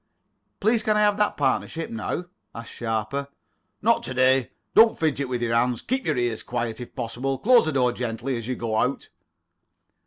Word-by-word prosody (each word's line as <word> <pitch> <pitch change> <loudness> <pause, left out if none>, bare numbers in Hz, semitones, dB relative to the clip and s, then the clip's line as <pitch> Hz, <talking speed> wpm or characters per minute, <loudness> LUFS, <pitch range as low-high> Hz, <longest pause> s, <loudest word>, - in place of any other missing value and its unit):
"Please 220 +2 +2
can 215 -1 +1
I - - +3
have 205 -1 +3
that 210 -1 +1
partnership 145 +3 -1
now?" 115 +10 -3 0.3
asked 115 0 -8
Sharper. 115 +4 -3 0.6
"Not - - +3
to 130 - -5
day. 130 0 +3 0.2
Don't 225 0 +6
fidget 145 -4 -1
with 120 -1 -2
your 115 -1 0
hands. 120 +1 +1
Keep 260 +1 -1
your 150 -4 +1
ears 120 -2 -1
quiet, 120 -1 -3
if 120 - -10
possible. 125 +4 -3
Close 240 - +5
the 155 - 0
door 125 -3 +2
gently 120 +2 -3
as 115 -1 -5
you 130 - -2
go 115 -2 -2
out." 125 +5 -1
130 Hz, 185 wpm, -24 LUFS, 115-160 Hz, 0.6 s, Don't